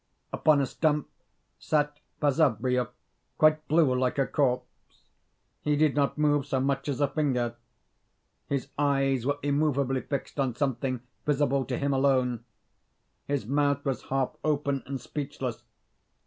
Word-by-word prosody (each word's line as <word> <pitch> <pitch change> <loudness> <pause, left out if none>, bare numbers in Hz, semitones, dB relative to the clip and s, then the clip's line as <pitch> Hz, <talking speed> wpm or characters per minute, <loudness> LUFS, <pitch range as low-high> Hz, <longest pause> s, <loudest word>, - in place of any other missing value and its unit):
Upon 150 -2 +4
a - - +2
stump 150 +2 0 0.5
sat 150 -1 0 0.2
Basavriuk, 125 -4 +2 0.5
quite 155 0 +4
blue 155 -4 +4
like 125 +1 0
a 135 - +3
corpse. 125 -3 +1 1.0
He 150 0 +1
did 150 -1 +3
not 140 0 +1
move 145 -1 +3
so 130 - 0
much 135 +1 -1
as 140 0 -2
a 145 - +4
finger. 130 -6 0 1.0
Hi 140 -2 +1 0.2
eyes 135 -3 +2
were 145 0 +1
immovably 140 -2 +1
fixed 140 +1 -5
on 130 -4 0
something 130 -2 -1 0.3
visible 140 -2 +2
to 125 - -2
him 140 0 0
alone; 130 -3 +2 0.8
his 140 -6 -1
mouth 140 +2 +1
was 135 -2 -2
half 135 -1 0
open 140 -2 0
and 135 0 -3
speechless. 135 -2 -5
140 Hz, 135 wpm, -28 LUFS, 130-145 Hz, 1.0 s, Upon